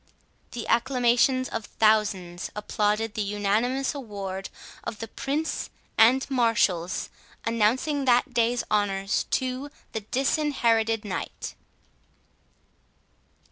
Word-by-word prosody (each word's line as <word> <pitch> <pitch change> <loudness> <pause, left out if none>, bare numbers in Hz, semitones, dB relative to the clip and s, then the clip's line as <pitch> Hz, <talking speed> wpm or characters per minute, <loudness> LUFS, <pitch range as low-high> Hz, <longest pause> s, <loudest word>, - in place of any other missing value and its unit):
The 240 -2 -4
acclamations 250 +1 +3
of 225 - -4
thousands 200 -6 +1
applauded 210 +1 0
the 215 - -2
unanimous 210 +6 0
award 200 -7 -5 0.3
of 215 - -5
the 225 - -6
Prince 290 +7 -2 0.3
and 245 +4 +5
marshals, 225 -9 +1 0.3
announcing 240 +6 +1
that 245 -1 +3
day's 235 +1 +2
honours 195 -2 +1
to 260 +2 -1 0.2
the 220 - -2
Disinherited 230 -3 +1
Knight. 190 -3 -5
225 Hz, 95 wpm, -26 LUFS, 210-255 Hz, 0.3 s, and